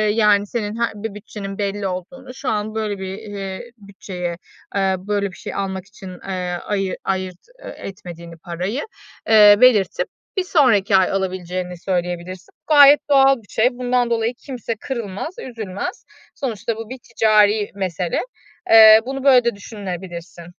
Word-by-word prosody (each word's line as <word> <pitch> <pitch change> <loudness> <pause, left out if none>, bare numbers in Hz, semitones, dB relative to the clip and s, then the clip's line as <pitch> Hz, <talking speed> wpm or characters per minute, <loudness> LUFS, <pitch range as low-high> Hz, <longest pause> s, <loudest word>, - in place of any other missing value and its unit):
yani, 205 -2 +3
senin 210 -1 -3
he 235 - +1
bir 210 0 -5
bütçenin 200 -1 -8
belli 200 -1 -2
olduğunu, 250 +9 -7
şu 265 0 -4
an 215 0 -2
böyle 210 -2 -2
bir, 190 0 -5
eee, 205 +1 -7
bütçeye, 185 -4 -6 0.4
eee, 195 -1 +2
böyle 200 0 -2
bir - - -14
şey - - -7
almak 190 -1 -3
için, 195 -1 -11 0.2
eee, 180 -2 -3
ayı 195 -2 -1
ayırt 185 -2 -2 0.3
e - - -7
etmediğini 170 -3 -9
parayı, 180 - -4 0.5
eee, 210 -2 +8
belirtip 220 -7 +4 0.3
bir 380 - +2
sonraki 240 - +3
ay 190 -1 +4
alabileceğini 185 -2 -3
söyleyebilirsin. 180 0 -4 0.2
Gayet 290 -1 +8
doğal 270 -1 +6
bir 220 - -18
şey. 230 +3 +2
Bundan 245 0 0
dolayı 230 0 0
kimse 245 -4 -4
kırılmaz, 230 - -5
üzülmez. 220 - -6 0.3
Sonuçta 230 - -3
bu 225 0 -8
bir 260 - -6
ticari 215 -2 +3
mesele. 180 -3 -2 0.5
Eee, 220 -1 +9
bunu 270 +1 -5
böyle 260 -3 +6
de 235 - +1
düşünebilirsin. 180 -5 -8
205 Hz, 150 wpm, -20 LUFS, 185-230 Hz, 0.5 s, Eee